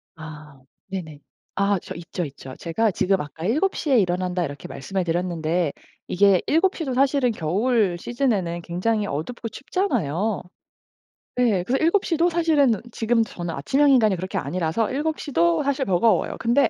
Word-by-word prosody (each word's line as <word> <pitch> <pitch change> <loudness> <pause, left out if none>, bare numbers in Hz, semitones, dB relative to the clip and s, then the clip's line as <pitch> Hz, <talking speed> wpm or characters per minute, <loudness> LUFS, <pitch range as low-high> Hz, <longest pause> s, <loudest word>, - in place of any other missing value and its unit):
아. 150 -3 -11 0.3
네네. 165 -6 -6 0.4
아 200 -1 +2
저 - - -8
있죠, 170 +1 -5
있죠. 135 -2 -10
제가 205 +6 0
지금 190 +2 +1
아까 160 +3 -7
"7 310 - +1
시에 275 -5 +2
일어난다." 180 -1 0
이렇게 145 0 -7
말씀을 190 +7 -3
드렸는데 170 -2 -1 0.4
이게 195 -1 +4
7 360 +5 +3
시도 280 -7 -3
사실은 270 -1 +2
겨울 200 +2 +1
시즌에는 200 -7 -1
굉장히 205 +5 -1
어둡고 225 +10 -4
춥잖아요. 220 - -1 0.9
네. 225 -8 +2
그래서 265 +9 0
7 375 +4 +3
시도 335 +1 +2
사실은 315 -7 +3 0.2
지금 230 0 +1
저는 175 -5 -5
아침형 275 - +2
인간이 220 -7 +4
그렇게 185 +2 -4
아니라서 180 +5 -1
7 310 +3 -1
시도 170 - +1
사실 275 -1 0
버거워요. 195 +4 +2
근데 240 +4 +3
200 Hz, 325 characters per minute, -23 LUFS, 170-260 Hz, 0.9 s, 이게